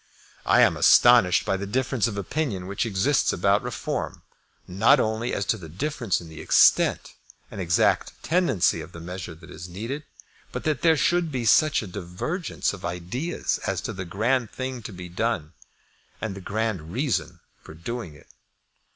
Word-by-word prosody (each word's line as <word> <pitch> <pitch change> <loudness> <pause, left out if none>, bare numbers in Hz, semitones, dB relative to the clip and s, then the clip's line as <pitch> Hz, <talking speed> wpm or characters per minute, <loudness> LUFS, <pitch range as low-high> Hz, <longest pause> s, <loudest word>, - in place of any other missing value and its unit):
I - - +5
am - - +4
astonished 120 -7 +6
by 95 - 0
the 100 +1 -5
difference 130 0 0
of 105 -3 -5
opinion 100 - -2
which 100 +4 -2
exists 115 +7 +2
about - - +2
Reform, - - -4 0.4
not 110 +10 +4
only 110 +2 -1
as 100 - -1
to - - -7
the 80 -3 -10
difference 120 - -1
in 85 - -11
the 80 -1 -10
extent - - +4 0.4
and 100 - -6
exact 85 -1 +2
tendency 160 - +2
of - - -11
the 85 - -9
measure 90 0 -7
that 80 +2 -15
is 85 +2 -9
needed, 115 +11 -5 0.5
but - - -5
that 155 -1 0
there 160 -2 +4
should 170 +4 +1
be 125 -3 -2
such 155 +4 +4
a - - -7
divergence 100 - -3
of 100 - -10
ideas 90 - -3
as - - -1
to - - -4
the 95 - -5
grand 110 +6 0
thing 130 -1 -5
to 110 - -8
be 90 -1 -8
done 90 -3 -2 0.7
and 105 -4 -4
the 100 - -8
grand 100 -5 -3
reason 130 +4 -1 0.2
for 80 - -12
doing 85 -1 -6
it. - - -17
105 Hz, 175 wpm, -25 LUFS, 90-130 Hz, 0.7 s, astonished